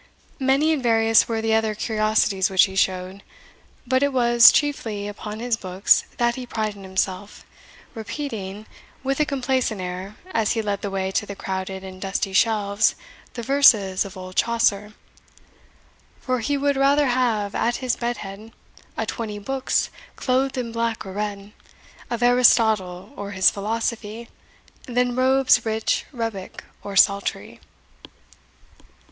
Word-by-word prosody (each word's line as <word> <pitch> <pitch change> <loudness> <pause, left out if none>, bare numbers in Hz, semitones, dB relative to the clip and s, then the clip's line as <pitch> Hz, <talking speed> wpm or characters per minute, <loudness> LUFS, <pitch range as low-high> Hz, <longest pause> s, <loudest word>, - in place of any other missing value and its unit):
Many 275 +4 +2
and 295 - -2
various 225 -2 +4
were 225 -1 -2
the 225 0 +1
other 220 -1 +1
curiosities 215 -3 +1
which 190 -1 +5
he 190 -1 -2
showed; 185 0 -1 0.6
but 260 +1 +1
it 285 0 +2
was 240 -2 +7
chiefly 225 -9 -1
upon 210 +1 -7
his 240 0 0
books 190 -1 +2
that 240 0 +2
he 250 0 -7
prided 215 -3 -3
himself, 190 +1 -3 0.5
repeating, 220 -4 -6 0.4
with 270 +1 -1
a 300 - +2
complacent 260 -5 -1
air, 185 +3 -6 0.2
as 220 - +1
he 225 - -1
led 200 -1 -2
the 200 - -3
way 190 -1 -2
to 210 - -1
the 200 - -6
crowded 190 0 -5
and 190 0 -10
dusty 195 0 -2
shelves, 210 0 +2 0.4
the 235 - -5
verses 220 -8 +4
of 195 -1 -10
old 185 0 -9
Chaucer 220 -3 +1 1.3
For 255 -1 -1
he 285 +5 -1
would 280 0 0
rather 280 +2 +3
have, 235 -5 0
at 240 +1 0
his 255 -2 -1
bed 240 0 -3
head, 205 +4 -10 0.4
A - - -1
twenty 220 -3 -5
books, 265 +5 -1 0.2
clothed 260 +1 0
in 240 -2 -3
black 230 -1 -2
or 190 - -7
red, 205 0 -5 0.6
Of 240 0 -2
Aristotle, 220 -6 +3
or 205 -3 -6
his 190 -1 +4
philosophy, 225 +2 -4 0.6
Than 245 0 0
robes 260 -1 +3
rich, 220 -1 -1
rebeck, 225 -7 -5 0.2
or 200 -1 -7
saltery. 200 +1 +2
220 Hz, 145 wpm, -23 LUFS, 200-245 Hz, 1.3 s, was